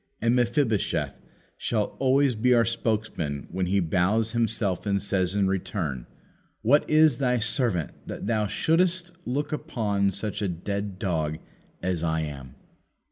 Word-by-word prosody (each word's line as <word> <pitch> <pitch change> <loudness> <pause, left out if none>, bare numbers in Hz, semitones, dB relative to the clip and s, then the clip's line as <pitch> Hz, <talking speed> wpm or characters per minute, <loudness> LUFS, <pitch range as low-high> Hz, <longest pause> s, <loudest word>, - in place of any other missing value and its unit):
And 115 +1 +2
Mephibosheth 120 -3 0 0.4
shall 105 -3 -1
always 135 0 +3
be 125 +3 +3
our 115 -1 +4
spokesman 110 -11 -2
when 95 0 -1
he 100 +2 +2
bows 95 +6 +1
himself 110 -5 0
and 100 -1 +2
says 95 -1 0
in 100 -2 +2
return: 85 - -2 0.6
"What 140 +7 +4
is 155 -4 +5
thy 125 -2 +2
servant, 110 - +1 0.2
that - - -6
thou 105 -1 +1
shouldst 175 - +1
look 140 +4 -2
upon 110 -10 0
such 105 +2 -4
a 100 - +1
dead 100 +3 -4
dog 80 -6 -1 0.5
as 90 -2 0
I 80 -1 0
am?" 70 -4 -7
105 Hz, 140 wpm, -26 LUFS, 90-125 Hz, 0.6 s, is